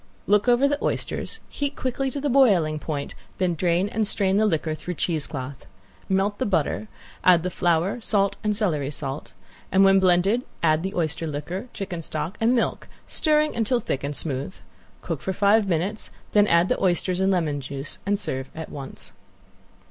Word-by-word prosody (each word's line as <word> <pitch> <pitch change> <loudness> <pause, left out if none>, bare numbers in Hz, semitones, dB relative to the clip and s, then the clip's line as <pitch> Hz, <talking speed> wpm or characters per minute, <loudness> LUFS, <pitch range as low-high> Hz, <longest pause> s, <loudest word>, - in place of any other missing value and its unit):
Look 210 +3 +3
over 245 +3 +5
the 290 +1 -1
oysters, - - -2
heat 285 0 -3
quickly 265 +1 -2
to 280 - -4
the 290 - -1
boiling 195 - +4
point, 145 -2 -4 0.2
then 180 -2 +1
drain 175 +3 +1
and 220 -1 -1
strain 195 -2 +2
the 215 +1 +4
liquor 160 -4 0
through 155 +3 -5
cheesecloth. 145 -5 -3 0.4
Melt 195 +2 +1
the 260 - 0
butter, 190 +3 0 0.4
add 175 -2 +6
the 185 - -2
flour, 175 +6 +1
salt 200 -3 +2
and 210 -1 +1
celery 160 -10 0
salt, 140 -1 -5 0.4
and 190 +1 +5
when 195 0 +6
blended 190 +5 +3 0.2
add 155 -1 +3
the 190 +3 -4
oyster 165 -1 -1
liquor, 155 - -4
chicken 185 -4 -5
stock 155 +4 -4
and 235 +3 +4
milk, 235 - -1 0.2
stirring 305 -1 +2
until 235 +2 +1
thick 140 - -3
and 145 +1 -3
smooth. 140 +4 -3 0.5
Cook 165 -6 -4
for 190 - -2
five 205 +2 +3
minutes, 190 +5 -1 0.2
then 210 0 +5
add 170 0 +4
the - - -1
oysters 180 0 +1
and 190 +1 +3
lemon 155 -6 0
juice, 135 +2 -5
and 200 +1 +1
serve 135 -9 -3
at 160 -1 -6
once. 135 -2 -8
185 Hz, 180 wpm, -24 LUFS, 155-210 Hz, 0.5 s, add